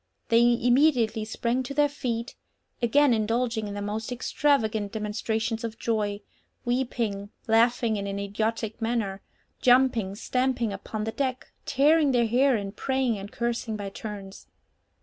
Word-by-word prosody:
They 230 Hz, -1 st, +5 dB, 0.2 s
immediately 245 Hz, -3 st, +3 dB
sprang 235 Hz, +3 st, -1 dB
to 260 Hz, +2 st, -6 dB
their 295 Hz, 0 st, +4 dB
feet, 240 Hz, -5 st, -4 dB, 0.5 s
again 265 Hz, +3 st, +4 dB
indulging 225 Hz, 0 st, 0 dB
in 200 Hz, -, -5 dB
the 205 Hz, -, -4 dB
most 215 Hz, +3 st, -4 dB
extravagant 225 Hz, -5 st, +1 dB
demonstrations 220 Hz, +1 st, -2 dB
of 230 Hz, -1 st, -4 dB
joy, 210 Hz, -3 st, -1 dB, 0.4 s
weeping, 235 Hz, -5 st, -1 dB, 0.2 s
laughing 230 Hz, 0 st, +3 dB
in 200 Hz, 0 st, -3 dB
an 195 Hz, 0 st, -3 dB
idiotic 220 Hz, +2 st, -2 dB
manner, 225 Hz, -4 st, -1 dB, 0.4 s
jumping, 245 Hz, -6 st, +3 dB
stamping 250 Hz, -1 st, 0 dB
upon 210 Hz, +2 st, -5 dB
the 220 Hz, -, -2 dB
deck, 255 Hz, +2 st, -3 dB, 0.2 s
tearing 295 Hz, +1 st, +4 dB
their 240 Hz, -1 st, +3 dB
hair, 255 Hz, +4 st, +3 dB
and 200 Hz, -1 st, -4 dB
praying 260 Hz, -4 st, 0 dB
and 200 Hz, +2 st, -8 dB
cursing 235 Hz, -1 st, -2 dB
by 200 Hz, -1 st, -5 dB
turns. 200 Hz, -2 st, -8 dB
230 Hz, 140 wpm, -26 LUFS, 210-250 Hz, 0.5 s, They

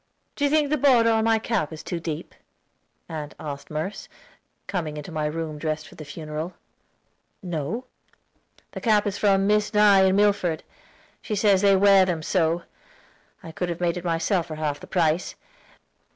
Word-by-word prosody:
"Do 285 Hz, -, 0 dB
you -, -, +3 dB
think 300 Hz, -1 st, +2 dB
the 305 Hz, -, +3 dB
border 245 Hz, -4 st, +5 dB
on 220 Hz, 0 st, +2 dB
my 225 Hz, 0 st, +4 dB
cap 220 Hz, -8 st, -1 dB
is 160 Hz, 0 st, -8 dB
too 175 Hz, -, -4 dB
deep?" 165 Hz, 0 st, -5 dB, 0.7 s
asked 150 Hz, -3 st, -6 dB
Aunt 140 Hz, -2 st, -7 dB
Merce, 160 Hz, +7 st, -5 dB, 0.6 s
coming 160 Hz, -6 st, -3 dB
into 150 Hz, +4 st, -7 dB
my 155 Hz, -1 st, -1 dB
room 155 Hz, -1 st, -4 dB
dressed 155 Hz, 0 st, -3 dB
for -, -, -15 dB
the 155 Hz, -, -9 dB
funeral. 155 Hz, +3 st, -6 dB, 0.9 s
"No." 175 Hz, -, -3 dB, 0.9 s
"The -, -, -7 dB
cap 215 Hz, -3 st, +3 dB
came 205 Hz, -, -1 dB
from 195 Hz, -1 st, +2 dB
Miss 210 Hz, +1 st, +1 dB
Nye 200 Hz, -2 st, +6 dB
in 190 Hz, 0 st, +3 dB
Milford; 200 Hz, -5 st, +2 dB, 0.6 s
she 215 Hz, -, -3 dB
says 200 Hz, -2 st, +3 dB
they 200 Hz, -1 st, +5 dB
wear 195 Hz, 0 st, +6 dB
them 170 Hz, -4 st, -2 dB
so. 170 Hz, -1 st, +1 dB, 0.8 s
I 165 Hz, -, -8 dB
could 175 Hz, +2 st, -3 dB
have 170 Hz, -, -4 dB
made 175 Hz, -1 st, 0 dB
it 180 Hz, -, -5 dB
myself 170 Hz, +1 st, 0 dB
for 155 Hz, -, -6 dB
half 150 Hz, -2 st, -2 dB
the -, -, -12 dB
price. 165 Hz, -1 st, 0 dB
175 Hz, 175 wpm, -24 LUFS, 155-205 Hz, 0.9 s, Nye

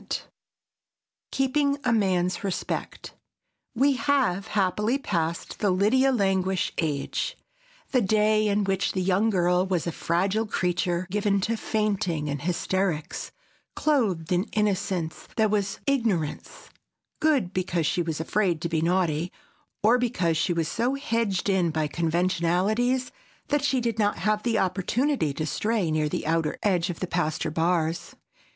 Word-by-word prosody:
[Sidenote: -, -, -4 dB, 1.1 s
KEEPING 280 Hz, +1 st, +1 dB
A 245 Hz, -2 st, +2 dB
MAN'S 185 Hz, -4 st, +1 dB
RESPECT] 195 Hz, -3 st, -4 dB, 0.6 s
We 275 Hz, +4 st, +4 dB
have, 260 Hz, -9 st, +1 dB
happily, 210 Hz, +5 st, +1 dB
passed 170 Hz, -, -3 dB
the 205 Hz, -, +2 dB
Lydia 220 Hz, +9 st, +3 dB
Languish 190 Hz, -5 st, +1 dB
age, 160 Hz, -, -2 dB, 0.5 s
the 255 Hz, -, +3 dB
day 215 Hz, +1 st, +3 dB
in 205 Hz, 0 st, +2 dB
which 195 Hz, 0 st, 0 dB
the 185 Hz, -, -1 dB
young 195 Hz, +4 st, +2 dB
girl 180 Hz, -2 st, +2 dB
was 180 Hz, -4 st, 0 dB
a 170 Hz, -, -1 dB
fragile 190 Hz, +7 st, 0 dB
creature, 175 Hz, -2 st, 0 dB
given 205 Hz, 0 st, +1 dB
to 230 Hz, +4 st, 0 dB
fainting 195 Hz, -9 st, -1 dB
and 140 Hz, -2 st, -3 dB
hysterics, 180 Hz, -1 st, -2 dB, 0.4 s
clothed 210 Hz, -, +1 dB
in 180 Hz, +2 st, +2 dB
innocence 195 Hz, -5 st, -1 dB
that 220 Hz, -2 st, +2 dB
was 200 Hz, -2 st, -1 dB
ignorance, 225 Hz, -, -1 dB, 0.5 s
good 275 Hz, -, +2 dB
because 175 Hz, -3 st, -1 dB
she 175 Hz, +4 st, +1 dB
was 160 Hz, -2 st, -3 dB
afraid 175 Hz, 0 st, 0 dB
to 170 Hz, -, -2 dB
be 160 Hz, -1 st, 0 dB
naughty, 170 Hz, -1 st, +1 dB, 0.5 s
or 235 Hz, +4 st, +5 dB
because 205 Hz, -9 st, 0 dB
she 160 Hz, +3 st, +1 dB
was 165 Hz, -2 st, 0 dB
so 245 Hz, -, 0 dB
hedged 230 Hz, -9 st, -1 dB
in 190 Hz, -4 st, +2 dB
by 155 Hz, -1 st, 0 dB
conventionalities 180 Hz, -, +1 dB, 0.4 s
that 290 Hz, -1 st, +1 dB
she 270 Hz, -2 st, +2 dB
did 230 Hz, -2 st, -2 dB
not 205 Hz, -1 st, +2 dB
have 215 Hz, 0 st, 0 dB
the 230 Hz, -1 st, 0 dB
opportunity 195 Hz, -, 0 dB
to 155 Hz, +3 st, -3 dB
stray 210 Hz, 0 st, 0 dB
near 155 Hz, -1 st, +1 dB
the -, -, -3 dB
outer 160 Hz, -1 st, 0 dB
edge 185 Hz, -4 st, +1 dB
of 175 Hz, -, -5 dB
the -, -, 0 dB
pasture 155 Hz, -2 st, -1 dB
bars. 165 Hz, 0 st, 0 dB
190 Hz, 145 wpm, -26 LUFS, 170-220 Hz, 1.1 s, or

